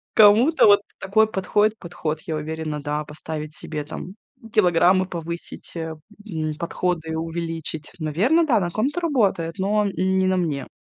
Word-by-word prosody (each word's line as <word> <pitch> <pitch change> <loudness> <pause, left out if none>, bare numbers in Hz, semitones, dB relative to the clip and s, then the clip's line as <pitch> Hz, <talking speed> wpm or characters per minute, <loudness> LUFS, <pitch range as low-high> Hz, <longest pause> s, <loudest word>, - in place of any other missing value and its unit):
Кому-то 225 +9 +6
вот 205 0 +6 0.2
такой 215 +3 +3
подходит 210 +2 +1
подход. 165 -3 -4
Я 160 - -4
уверена, 155 -1 -4
да, 150 +1 -2
поставить 155 0 -6
себе 150 -2 -4
там 180 +5 -8 0.4
килограммы 185 -1 +4
повысить, 170 -1 -6
а, 160 -1 -4 0.3
м, 155 -4 -2
подходы 170 -2 -2
увеличить. 165 -2 -4
Наверное, 210 - +2
да, 240 -8 +3
на 175 - -1
ком-то 265 - -1
работает, 200 - +1
но, 205 +2 +1
м, 200 - -1 0.3
не 190 0 +2
на 185 0 +2
мне. 145 -7 -1
170 Hz, 150 wpm, -23 LUFS, 160-205 Hz, 0.4 s, Кому-то